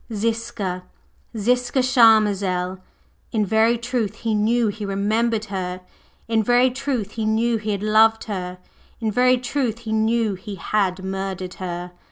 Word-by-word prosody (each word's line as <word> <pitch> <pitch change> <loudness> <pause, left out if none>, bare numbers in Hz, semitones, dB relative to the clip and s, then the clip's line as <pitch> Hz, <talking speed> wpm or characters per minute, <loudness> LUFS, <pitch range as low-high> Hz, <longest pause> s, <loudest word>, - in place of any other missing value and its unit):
Ziska! 220 -4 -2 0.6
Ziska 245 +4 +1
Charmazel! 205 -7 +3 0.5
In 215 -3 +1
very 220 +3 +3
truth 235 -3 -2
he 225 -1 -2
knew 220 +2 +2
he 210 +1 -6
remembered 215 +3 0
her; 185 -2 -4 0.5
in 225 -1 +2
very 245 +3 +3
truth 255 -6 -3
he 220 -1 -3
knew 225 +2 +1
he 215 0 -5
had 200 -1 -2
loved 220 +1 +4
her; 185 -4 -5 0.4
in 220 -2 -1
very 250 +3 +4
truth 245 -2 -2
he 225 -2 -6
knew 220 0 +1
he 195 +2 -7
had 190 0 -1
murdered 190 -1 -4
her! 175 -1 -5
220 Hz, 145 wpm, -22 LUFS, 195-235 Hz, 0.6 s, loved